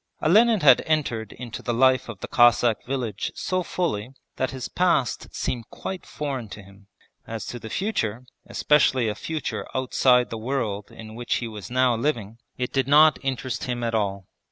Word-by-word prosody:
Olenin 215 +5 +4
had 135 -4 +7
entered 120 -9 0
into 120 -2 -8
the 120 - -2
life 130 0 +3
of 105 -5 -8
the - - -5
Cossack 120 -2 +4
village 120 -6 -3
so 185 0 -1
fully 125 - -2 0.3
that 130 - 0
his 130 -2 -5
past 170 -10 +1
seemed 120 -3 -4
quite 190 -1 -7
foreign 135 -7 -4
to 105 - -9
him. 100 +1 -18 0.4
As 115 -1 -5
to 120 - -6
the 110 - -8
future, 125 - -2 0.2
especially 130 -5 +3
a - - -1
future 155 +8 -4
outside 125 -1 +3
the 115 - -4
world 110 -5 -3
in 110 -1 -11
which 120 +1 -2
he 120 - -2
was 105 -4 -8
now 125 -1 +3
living, 115 -4 -2 0.2
it 125 -1 -3
did 135 -2 +1
not 150 +1 +6
interest 130 -2 -3
him 120 -1 -3
at 115 -1 -1
all. 100 -3 -1
125 Hz, 180 wpm, -24 LUFS, 110-135 Hz, 0.4 s, had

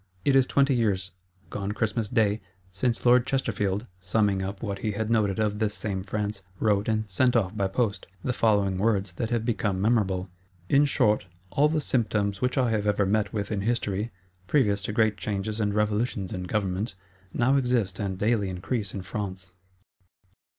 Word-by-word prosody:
It 140 - +4
is 130 -1 +5
twenty 140 0 +3
years, 100 -6 0 0.4
gone 100 0 -3
Christmas 110 0 -1
day, 110 -3 +2 0.3
since 115 +6 -1
Lord 120 0 +5
Chesterfield, 105 -6 -1
summing 100 +1 +1
up 95 +2 -5
what 100 -3 -3
he 105 -2 -2
had 110 +2 -2
noted 105 -3 +2
of 105 -1 0
this 105 -2 0
same 100 -3 -3
France, 105 0 -3 0.2
wrote, 105 -2 +2
and 110 0 +1
sent 125 +6 +2
off 105 -3 +1
by 100 -2 +1
post, 100 +1 -1 0.2
the 125 - 0
following 100 -5 +2
words, 100 -2 +1
that 110 +6 -3
have 120 -2 0
become 105 -5 0
memorable: 95 -4 +1 0.4
"In 140 +1 +5
short, 105 -8 +2 0.2
all 150 +2 +3
the 155 0 +1
symptoms 105 -7 0
which 125 +2 0
I 125 -3 +3
have 105 -2 0
ever 100 0 +2
met 105 +1 +1
with 100 -1 -3
in 100 -2 -1
History, 105 -1 -1 0.4
previous 105 -8 +2
to - - -2
great 110 -1 +2
Changes 105 +3 -2
and 105 -1 +1
Revolutions 105 -1 0
in 90 -2 -4
government, 95 0 -2 0.4
now 125 +5 +2
exist 125 -8 +1
and 95 -3 -2
daily 105 -1 +1
increase 100 +3 -3
in 95 - -4
France." 95 -1 -5
105 Hz, 180 wpm, -27 LUFS, 100-115 Hz, 0.4 s, is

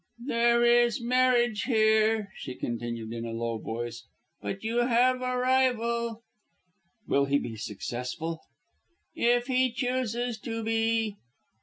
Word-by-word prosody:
"There 235 -2 +3
is 240 0 +4
marriage 240 -2 +2
here", 220 -3 +3
she 130 - -7
continued 115 -1 -4
in 115 0 -5
a 115 - -4
low 115 0 -2
voice; 120 +1 -5 0.3
"but 195 - -5
you 225 +2 -1
have 245 +1 +3
a 255 0 -1
rival." 235 -3 +1 0.8
"Will 140 0 +3
he 140 +1 +2
be 120 -5 -5
successful?" 125 +9 -5 0.7
"If 240 +1 +2
he 255 -1 +2
chooses 245 -1 -2
to 225 0 -4
be." 225 -1 0
230 Hz, 125 wpm, -28 LUFS, -, 0.8 s, is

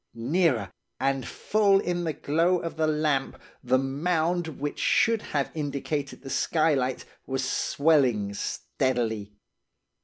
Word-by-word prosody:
Nearer, 120 - +1 0.3
and 135 -1 0
full 205 -2 +2
in 175 -2 -2
the 160 - -1
glow 165 +5 +1
of 165 -1 -5
the 160 0 +1
lamp, 150 -3 0 0.2
the 130 +1 +3
mound 160 +5 0
which 145 +1 -3
should 225 -1 +3
have 140 -8 -2
indicated 145 -2 -3
the 135 - -7
skylight, 145 -6 +1 0.2
was 135 -1 -1
swelling 135 -10 +2
steadily. 110 -2 -2
145 Hz, 120 wpm, -27 LUFS, 130-165 Hz, 0.3 s, the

